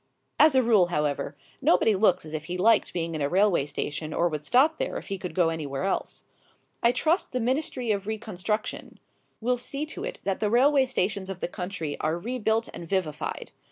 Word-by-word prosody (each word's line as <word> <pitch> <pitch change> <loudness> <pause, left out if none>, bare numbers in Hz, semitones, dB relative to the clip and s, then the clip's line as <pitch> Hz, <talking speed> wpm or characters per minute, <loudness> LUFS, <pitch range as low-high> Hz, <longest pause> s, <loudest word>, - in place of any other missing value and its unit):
As 310 -3 +6
a 260 - +5
rule, 215 -6 +4
however, 150 -3 -1 0.3
nobody 195 +4 +4
looks 185 -4 +2
as 155 - -9
if 155 -1 -4
he 180 +2 -4
liked 220 +4 +3
being 165 -1 -3
in 155 - -3
a 140 - +1
railway 185 -5 +3
station 150 +2 -4
or 175 - +3
would 150 -2 -4
stop 270 - +3
there - - -2
if - - -8
he 195 -1 -3
could 180 -1 -6
go 175 -3 +3
anywhere 150 -2 -3
else. 195 - -2 0.6
I 235 - +5
trust 315 +8 0
the 255 - 0
Ministry 250 -1 -1
of 200 -1 -2
Reconstruction 215 -1 -4 0.4
will 245 +2 +1
see 275 +4 -3
to 325 +5 -7
it - - -4
that 195 -1 -1
the 210 - +1
railway 265 +3 +4
stations 195 -5 -1
of 190 -2 -5
the - - -2
country 180 -4 -5
are 155 +2 0
rebuilt 225 +2 -1
and 170 - -8
vivified. 165 -6 -2
195 Hz, 200 wpm, -27 LUFS, 165-240 Hz, 0.6 s, As